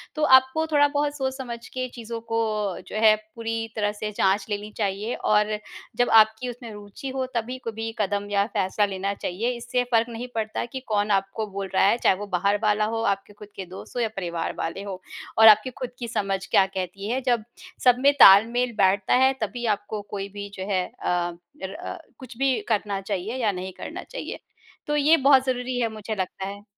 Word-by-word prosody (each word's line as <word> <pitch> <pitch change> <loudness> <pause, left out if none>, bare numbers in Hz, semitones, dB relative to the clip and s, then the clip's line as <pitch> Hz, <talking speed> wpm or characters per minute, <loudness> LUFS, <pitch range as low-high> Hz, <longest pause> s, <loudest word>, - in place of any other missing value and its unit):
तो 305 - -1
आपको 260 +5 0
थोड़ा 290 -1 +5
बहुत 290 0 0
सोच 265 -1 -1
समझ 240 -3 -6
के 255 0 -4
चीज़ों 230 -1 -6
को, 225 - +2 0.5
जो - - -8
है, 215 -1 +7 0.2
पूरी 225 0 -3
तरह 205 -1 0
से 210 0 -5
जाँच 195 +2 +2
लेनी 205 +1 -4
चाहिए 205 +2 -1
और 210 0 +1 0.4
जब 245 - +3
आपकी 220 +3 -1
उसमें 235 -2 -8
रुचि 205 +6 -8
हो, 260 0 -2
तभी 240 +3 -2
कभी 225 0 -4
कदम 205 0 -1
या 200 0 +3
फैसला 190 +2 +2
लेना 195 0 -2
चाहिए। 205 +6 -2
इससे 245 +1 -1
फ़र्क 230 +1 +3
नहीं 235 +2 -6
पड़ता 220 +1 -2
कि 260 +2 -6
कौन 210 -1 +1
आपको 195 +2 0
बोल 195 0 -4
रहा - - +4
है, 205 - +4
चाहे 190 - +3
वो 205 +1 -7
बाहर 200 +3 +2
वाला 210 0 +3
हो, 225 +1 -2
आपके 195 +1 -12
खुद 205 0 -12
के 190 - -6
दोस्त 185 +7 -11
हों 245 - +1
या 225 - 0
परिवार 170 -3 -3
वाले 170 +4 -3
हों। 195 -2 -5 0.4
और 220 - +9
आपकी 215 +3 +7
खुद 255 - -3
की 235 - -4
समझ 200 -4 -1
क्या 190 - +6
कहती 195 +2 -5
है, 255 - 0
जब 240 -4 +1 0.4
सब 250 -1 +6
में 280 +2 +5
ताल-मेल 235 +5 +7
बैठता 190 0 +3
है, 265 +1 +5
तभी 235 +3 -3
आपको 210 +1 -5
कोई 200 0 -4
भी 205 0 -6
जो 190 - -5
है, 185 -2 +1 0.2
अ, 175 -1 -1 0.3
र, 190 +1 -6 0.2
कुछ 255 -3 -11
भी 270 -1 +2
करना 205 -3 0
चाहिए 200 +4 -3
या 210 -3 +2
नहीं 185 0 -6
करना - - -7
चाहिए। - - -7 0.5
तो 295 - 0
ये 300 +3 +5
बहुत 265 -2 +6
ज़रूरी 250 -1 -1
है, 230 - +1
मुझे 215 +1 -4
लगता 190 0 -4
है। 200 +1 -8
215 Hz, 205 wpm, -25 LUFS, 200-245 Hz, 0.5 s, और